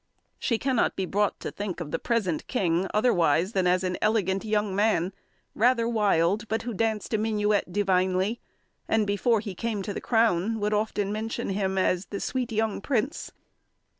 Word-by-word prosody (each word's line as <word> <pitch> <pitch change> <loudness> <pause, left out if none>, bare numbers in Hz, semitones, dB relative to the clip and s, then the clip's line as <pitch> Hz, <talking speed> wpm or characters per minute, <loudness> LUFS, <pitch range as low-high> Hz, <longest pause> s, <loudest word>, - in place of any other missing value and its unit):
She 230 - 0
cannot 255 0 +1
be 190 - -1
brought 205 +2 0
to - - -4
think 200 -4 -5
of 155 -4 -6
the - - -1
present 205 -10 -1
king 185 -6 0
otherwise 185 -6 +2
than 190 -4 +1
as 180 +1 +2
an 180 -1 -2
elegant 195 -3 +1
young 210 -2 0
man, 200 -3 +1 0.4
rather 235 +1 +3
wild, 210 -2 +2
but 220 +1 -1
who 240 0 -4
danced 220 +1 -1
a 220 - +2
minuet 210 -3 0
divinely; 190 +2 +1 0.5
and 220 -1 +2
before 205 +2 +1
he 205 -3 -6
came 215 0 -3
to 205 - -4
the - - -5
crown, 225 -2 +2
would 210 +1 0
often 210 -1 0
mention 225 +2 -3
him 190 -1 -1
as 185 0 +1
the 200 - -5
"sweet 255 -2 -2
young 220 -2 -1
prince." 270 +6 -2
210 Hz, 175 wpm, -26 LUFS, 190-225 Hz, 0.5 s, rather